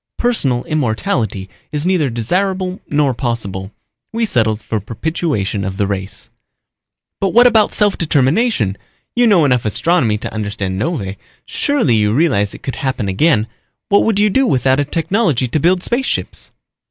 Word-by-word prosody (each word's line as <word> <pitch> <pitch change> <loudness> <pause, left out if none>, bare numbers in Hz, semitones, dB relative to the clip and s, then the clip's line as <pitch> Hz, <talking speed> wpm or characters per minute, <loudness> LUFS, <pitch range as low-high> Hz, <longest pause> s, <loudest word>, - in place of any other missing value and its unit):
Personal 140 - 0
immortality 115 - -1 0.2
is 150 +1 -3
neither 180 -7 +2
desirable 185 - -1
nor 145 -2 +2
possible. 110 -6 -3 0.4
We 230 0 0
settled 110 - +1
for 110 -1 -3
perpetuation 115 - -2
of 95 -1 -4
the 100 - +1
race." 95 -1 -5 0.9
"But 195 +1 -1
what 240 +1 +7
about 225 -4 +4
self 205 -2 +1
determination? 145 - +1 0.4
You 240 0 +4
know 185 -8 +5
enough 125 -4 +2
astronomy 115 0 +1
to 105 - -6
understand 100 -3 -3
novae. 105 - -3 0.3
Surely 285 - +1
you 105 0 +2
realize 105 -10 +1
it - - -13
could 135 - -4
happen 130 -6 -2
again. 105 - +2 0.4
What 200 - +5
would 225 -3 +1
you 210 0 +3
do 265 +6 +2
without 130 - +2
a 145 - +1
technology 165 - 0
to 155 - -1
build 180 +4 +2
spaceships?" 255 +3 -2
135 Hz, 155 wpm, -17 LUFS, -, 0.9 s, what